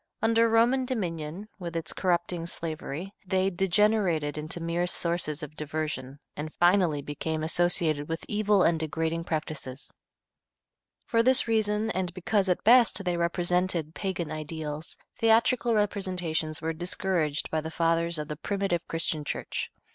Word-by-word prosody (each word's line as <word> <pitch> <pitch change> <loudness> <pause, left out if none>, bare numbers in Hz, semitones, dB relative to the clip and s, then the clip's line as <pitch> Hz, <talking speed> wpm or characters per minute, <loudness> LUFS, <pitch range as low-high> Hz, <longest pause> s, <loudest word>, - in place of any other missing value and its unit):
Under 230 +1 +4
Roman 235 +4 +4
dominion, 180 - -3
with 170 -2 -6
its 165 -1 -3
corrupting 175 -2 0
slavery, 165 +2 -5
they 190 0 +1
degenerated 185 -5 +2
into 155 +3 -3
mere 170 +1 -1
sources 170 -3 -1
of 150 0 -8
diversion, 150 -3 -4 0.2
and 155 +1 -5
finally 175 -5 +3
became 155 +2 -3
associated 160 -3 +2
with 165 0 -3
evil 210 -2 +3
and 165 -1 +3
degrading 160 +1 -2
practices. 155 -5 -4 1.1
For 230 -3 +3
this 255 +1 +4
reason 220 -1 +1
and 185 -3 -2
because 195 +1 +1
at 180 - +1
best 230 -4 +5
they 180 -1 +1
represented 175 -1 0
pagan 175 -5 -3
ideals, 155 0 -5 0.2
theatrical 230 +1 +3
representations 180 -7 -1
were 165 0 -1
discouraged 175 -3 -1
by 155 - 0
the 160 - -5
fathers 165 +1 +1
of 150 -1 -4
the 150 - -4
primitive 195 -1 -1
Christian 165 -2 -2
Church. - - -4
170 Hz, 140 wpm, -28 LUFS, 155-195 Hz, 1.1 s, best